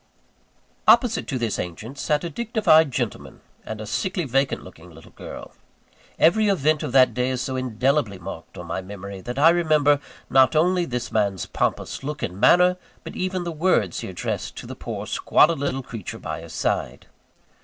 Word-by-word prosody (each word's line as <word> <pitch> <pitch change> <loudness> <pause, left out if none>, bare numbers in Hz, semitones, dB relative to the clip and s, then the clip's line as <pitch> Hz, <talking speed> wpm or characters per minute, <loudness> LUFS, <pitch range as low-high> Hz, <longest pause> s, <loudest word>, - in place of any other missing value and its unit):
Opposite 235 -4 +4
to 135 - -2
this 115 -3 -2
ancient 110 +10 -6
sat 150 0 0
a 170 - -3
dignified 200 - +3
gentleman 120 -4 -4 0.2
and 110 -1 -6
a 110 - -6
sickly 185 - -2
vacant 135 +1 0
looking 90 -1 -14
little 80 -1 -15
girl. - - -10 0.6
Every 210 +6 +4
event 155 -6 +2
of - - -3
that 130 -1 +5
day 125 0 0
is 130 -1 -2
so 130 - -3
indelibly 130 -2 0
marked 85 -2 -9
on 90 - -7
my 85 +3 -3
memory, 100 0 -8
that 120 +6 -6
I 155 +4 +7
remember, 155 -4 +3 0.3
not 130 +3 +4
only 175 +3 +3
this 125 -4 -4
man's 100 -4 0
pompous - - -2
look 150 +1 -5
and 90 +2 -4
manner, 180 - +5 0.3
but - - -8
even 185 -1 -2
the 170 - -3
words 155 - +1
he - - -6
addressed - - -4
to - - -8
the - - -7
poor - - -6
squalid 160 -1 +3
little 135 -1 -2
creature 115 -6 -7
by - - -6
his - - -11
side. - - -2
135 Hz, 180 wpm, -23 LUFS, 110-165 Hz, 0.6 s, I